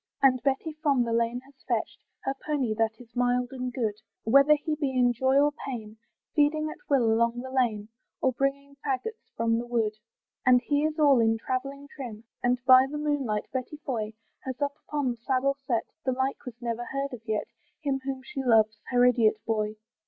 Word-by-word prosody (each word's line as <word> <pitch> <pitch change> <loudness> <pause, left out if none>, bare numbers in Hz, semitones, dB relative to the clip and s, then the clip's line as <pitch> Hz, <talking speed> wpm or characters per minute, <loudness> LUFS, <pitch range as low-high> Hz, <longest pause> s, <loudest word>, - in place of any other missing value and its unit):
And 255 -2 +5
Betty 280 +3 0
from 280 -5 +3
the 230 -1 -2
lane 235 +1 +1
has 275 +2 -20
fetched - - -1 0.2
Her 270 - 0
pony, 275 -7 0
that 220 0 0
is 245 -1 -15
mild 245 0 +1
and 255 -1 -4
good, 230 -4 -1 0.3
Whether 275 +6 +6
he 305 +1 -3
be 295 -2 -1
in 245 -1 +4
joy 260 +3 +2
or 290 +1 +4 0.2
pain, 220 -4 -6 0.4
Feeding 310 +1 +2
at - - -11
will 275 -4 +4
along 235 +1 +1
the 260 0 -7
lane, 225 -5 0 0.3
Or 260 - +2
bringing 275 +2 -2
faggots 370 - -3
from 230 0 +2
the 240 - -5
wood. 225 -3 0 0.5
And 250 0 +6
he 290 +4 +1
is 310 0 -1
all 285 -4 +5
in 225 0 +3
travelling 275 +4 -4
trim, 240 -6 -8 0.2
And 245 +1 +2
by 260 0 +8
the 295 - -4
moonlight, 285 -8 -1
Betty 260 +3 -3
Foy 225 -7 -3 0.3
Has 260 0 -6
up 285 -1 0
upon 290 -4 0
the 240 - -6
saddle 265 +3 +1
set, 235 -3 +1 0.2
The 260 - +1
like 265 +3 -2
was 240 -1 -8
never 240 0 -3
heard 275 +1 -3
of 240 - -7
yet, 215 -1 0 0.4
Him 275 -3 0
whom 265 -1 -4
she 270 +1 -5
loves, 220 -3 +4
her 245 -1 +4
idiot 230 -3 +4
boy. 215 -1 -1
255 Hz, 195 wpm, -28 LUFS, 235-275 Hz, 0.5 s, by